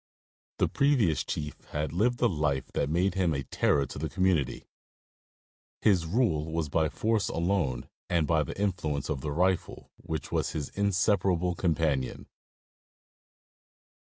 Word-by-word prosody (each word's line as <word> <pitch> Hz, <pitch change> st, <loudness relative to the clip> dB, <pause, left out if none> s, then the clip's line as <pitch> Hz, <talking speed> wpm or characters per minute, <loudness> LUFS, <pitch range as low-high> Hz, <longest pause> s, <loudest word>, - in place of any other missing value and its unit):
The -, -, +2 dB
previous 125 Hz, -, +2 dB
chief 75 Hz, -1 st, -4 dB
had 75 Hz, +1 st, -2 dB
lived 120 Hz, +7 st, +1 dB
a -, -, +6 dB
life 75 Hz, -, 0 dB
that 70 Hz, -, 0 dB
made 90 Hz, +5 st, +1 dB
him 90 Hz, -5 st, +1 dB
a 70 Hz, -, -2 dB
terror 70 Hz, +2 st, +1 dB
to 70 Hz, -, -8 dB
the 80 Hz, +1 st, -2 dB
community. 90 Hz, -7 st, 0 dB, 1.1 s
His 90 Hz, -6 st, +3 dB
rule 80 Hz, -7 st, +1 dB
was 80 Hz, -2 st, -1 dB
by 80 Hz, +1 st, +2 dB
force 110 Hz, +3 st, 0 dB
alone 80 Hz, -8 st, 0 dB, 0.2 s
and 85 Hz, -3 st, +2 dB
by 80 Hz, 0 st, +2 dB
the 75 Hz, -, -5 dB
influence 80 Hz, -8 st, -1 dB
of 70 Hz, -4 st, -2 dB
the 75 Hz, -, -3 dB
rifle, 90 Hz, +4 st, -1 dB
which 80 Hz, -2 st, -5 dB
was -, -, 0 dB
his 75 Hz, -3 st, -3 dB
inseparable 95 Hz, -3 st, +1 dB
companion. 80 Hz, -7 st, 0 dB
80 Hz, 140 wpm, -29 LUFS, 75-95 Hz, 1.1 s, a